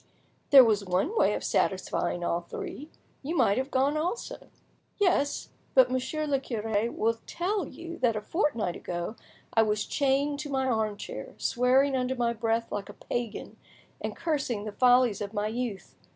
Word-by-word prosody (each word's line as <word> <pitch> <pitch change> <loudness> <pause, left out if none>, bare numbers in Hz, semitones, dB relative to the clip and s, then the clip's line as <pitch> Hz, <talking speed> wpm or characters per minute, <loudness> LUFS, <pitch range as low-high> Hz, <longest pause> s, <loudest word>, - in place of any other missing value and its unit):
"There 275 -2 +10
was 215 -4 +2
one 195 - 0
way - - +3
of - - -4
satisfying 175 - 0
all 170 0 0
three—you 295 - -7
might 200 +5 +3
have 265 +1 -2
gone 275 +3 +2
also." 370 +10 -3 0.5
"Yes, 355 -8 +1 0.3
but 255 -1 +6
Monsieur 260 +4 -1
le 280 -2 +1
cure 225 -3 -1
will 230 0 0
tell 380 +3 -1
you 335 0 -9
that 240 -3 +2
a 215 - -2
fortnight 230 - 0
ago 175 +5 -4 0.4
I 225 - +5
was 210 -1 +1
chained 285 +1 +1
to 295 0 -5
my 265 -1 0
arm 220 -4 0
chair, - - -7
swearing 265 +3 +3
under 255 0 0
my 240 -1 +1
breath 230 0 -1
like 200 -1 -4
a - - -8
pagan, 240 -3 -5 0.5
and - - -3
cursing 275 -10 -2
the 215 - -4
follies 245 -2 +4
of 205 +1 -4
my 205 0 0
youth! 225 -2 -4
250 Hz, 165 wpm, -28 LUFS, 215-285 Hz, 0.5 s, There